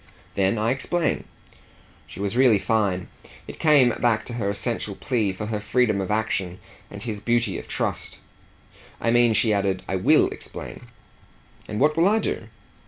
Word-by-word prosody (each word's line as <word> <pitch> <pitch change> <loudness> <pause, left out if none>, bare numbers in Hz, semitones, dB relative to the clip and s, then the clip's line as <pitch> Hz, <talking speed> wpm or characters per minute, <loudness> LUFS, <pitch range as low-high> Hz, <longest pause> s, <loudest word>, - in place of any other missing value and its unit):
"Then 95 +3 +1
I 110 +2 +1
explain." 155 +6 -1 0.8
She - - -11
was 100 +2 -2
really 125 -4 +5
fine; 100 -4 0 0.4
it - - -9
came 145 -6 +5
back 115 -3 +2
to 120 - -7
her 110 -4 -1
essential 105 0 -3
plea 115 -6 0
for 95 +3 -6
her 105 0 -2
freedom 105 -1 +1
of 95 - -4
action 100 -4 -1 0.3
and 100 0 -9
his 110 -4 -4
beauty 115 -2 0
of - - -11
trust. - - -3 0.8
"I 115 - +1
mean," 120 -1 +4
she 110 -1 +2
added, 95 -2 0
"I 95 - -1
WILL 90 - +4
explain." - - -9 0.8
"And 105 - -4
what 150 +3 +3
will 165 +3 +4
I 215 +2 +3
do?" 155 - -3
110 Hz, 170 wpm, -24 LUFS, 100-120 Hz, 0.8 s, really